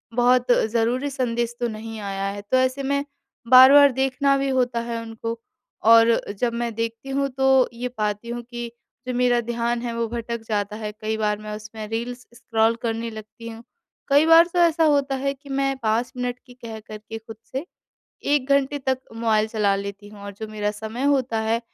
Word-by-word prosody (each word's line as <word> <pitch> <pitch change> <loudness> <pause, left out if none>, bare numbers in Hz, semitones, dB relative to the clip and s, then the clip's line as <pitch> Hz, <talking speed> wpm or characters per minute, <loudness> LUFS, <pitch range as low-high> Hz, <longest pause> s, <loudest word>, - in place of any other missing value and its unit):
बहुत 245 +1 +3
ज़रूरी 240 +4 +1
संदेश 240 -3 -2
तो 240 - 0
नहीं 220 0 -7
आया 195 -1 -4
है। 200 +1 -5
तो 210 +6 0
ऐसे 260 +1 +1
में 280 +1 0 0.5
बार-बार 275 +2 +9
देखना 270 +2 +1
भी 275 0 -1
होता 250 -2 +1
है 230 0 -3
उनको 230 0 -6 0.5
और 230 0 +7 0.3
जब 240 -2 0
मैं 235 0 -2
देखती 230 +3 -4
हूँ 275 +1 0
तो 265 0 +3
ये 240 +2 -4
पाती 210 +1 -2
हूँ 240 0 -4
कि 240 -1 -5 0.4
जो 255 - -2
मेरा 245 0 +2
ध्यान 235 0 -2
है 240 -1 -3
वो 230 0 -1
भटक 235 0 -4
जाता 210 -1 -2
है 215 -1 -5
कई 220 0 -2
बार 210 -1 0
मैं 215 0 -6
उसमें 215 0 -8
रील्स 235 +3 -4
स्क्रॉल 230 -1 +1
करने 230 0 -2
लगती 220 +1 -10
हूँ, 225 0 -10 0.4
कई 285 +2 +5
बार 330 +1 +7
तो 355 - +1
ऐसा 335 -1 +4
होता 285 -3 +2
है 275 +1 -1
कि 280 +1 -17
मैं 275 0 0
5 230 +3 0
मिनट 250 0 -3
की 250 - -15
कह 230 -3 -9
कर 215 0 -10
के 220 +1 -8
खुद 225 0 -11 0.2
से 265 +5 -3 0.7
1 275 -2 0
घंटे 280 +1 +2
तक 265 -1 -1 0.2
मोबाइल 220 -2 +1
चला 210 -3 +1
लेती 200 +1 -7
हूँ 205 -1 -13
और 200 - -6
जो 220 +3 -7
मेरा 210 -1 -2
समय 220 +4 -6
होता 260 -5 +1
है, 225 +1 0
235 Hz, 200 wpm, -23 LUFS, 220-260 Hz, 0.7 s, बार-बार